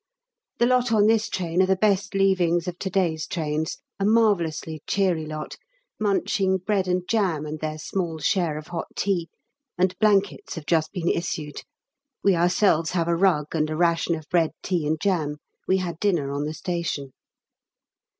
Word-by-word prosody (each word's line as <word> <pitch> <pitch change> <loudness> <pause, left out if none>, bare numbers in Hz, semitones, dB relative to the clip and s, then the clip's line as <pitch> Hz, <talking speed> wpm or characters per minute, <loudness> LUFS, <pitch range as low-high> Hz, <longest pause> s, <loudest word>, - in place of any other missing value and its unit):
The 240 - +3
lot 250 -1 +2
on 210 -2 +4
this 225 0 +3
train 175 0 0
are 185 - +3
the 190 - +3
best 200 0 +1
leavings 180 -3 +2
of 175 0 -5
to 190 - -3
day's 170 -4 0
trains, 155 -2 -2 0.2
a - - 0
marvellously 175 -8 +1
cheery 180 -6 +1
lot, 155 0 -6 0.4
munching 195 -2 +1
bread 190 0 0
and 180 0 0
jam 185 -9 +1
and 155 +1 -5
their 155 0 -3
small 165 +1 -3
share 160 -1 0
of 155 - -9
hot 170 -2 -4
tea, 180 -5 0 0.5
and 185 +1 +2
blankets 205 -2 +2
have 160 -3 -7
just 160 -1 +1
been 175 -3 -3
issued. 155 -4 -2 0.6
We 195 -2 +4
ourselves 170 -1 +3
have 170 -2 0
a 170 - +2
rug, 165 -5 +2
and 155 -1 0
a 155 - -2
ration 170 0 +2
of 155 -2 -9
bread, 170 -3 +2
tea, 175 -5 -1
and 155 +1 0
jam; 160 -6 0 0.3
we 190 - +3
had 175 -3 -4
dinner 170 -9 +1
on 140 +1 -2
the 155 +1 -4
station. 165 -7 -3
175 Hz, 175 wpm, -24 LUFS, 155-195 Hz, 0.6 s, on